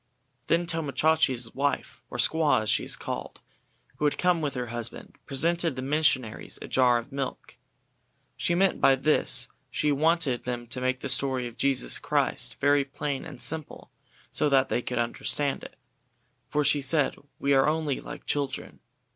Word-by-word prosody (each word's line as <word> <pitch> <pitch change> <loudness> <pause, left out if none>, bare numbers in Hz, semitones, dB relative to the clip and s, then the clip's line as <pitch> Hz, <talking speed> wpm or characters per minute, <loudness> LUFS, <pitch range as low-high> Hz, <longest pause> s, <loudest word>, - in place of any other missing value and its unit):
Then 170 +1 +2
Tomo 165 -5 -1
Chachi's 130 -7 +2
wife, 140 +1 -2
or - - -6
squaw 155 -8 +3
as 110 - 0
she - - +2
is - - 0
called, - - -6 0.6
who 150 - -1
had 145 - +1
come 180 -2 +2
with 145 -3 -2
her 125 -2 -3
husband, 120 -1 -5
presented 165 +2 +1
the 130 - -4
missionaries 130 -5 0
with - - -9
a - - -7
jar 125 -2 +5
of 120 +4 -6
milk. 135 -1 -5 0.8
She 175 - 0
meant 195 +2 +2
by 135 - +6
this 150 +4 +3
that - - -28 0.2
she 150 - 0
wanted 150 -3 +2
them 120 -1 -4
to 125 +2 -5
make 130 0 0
the - - -3
story 130 -1 +1
of 120 -1 -7
Jesus 135 - 0
Christ - - 0
very 145 0 +4
plain 140 +1 -4
and 145 -7 -9
simple 160 +1 -3 0.4
so 150 - +2
that 135 -1 +3
they 120 - 0
could 125 - -4
understand 135 +4 0
it, - - -10 0.7
for 150 - +1
she 145 0 +2
said 135 0 +1 0.2
"we 140 0 +1
are 135 +2 +4
only 155 -3 -1
like - - -9
children." 145 -2 -3
140 Hz, 180 wpm, -27 LUFS, 130-155 Hz, 0.8 s, by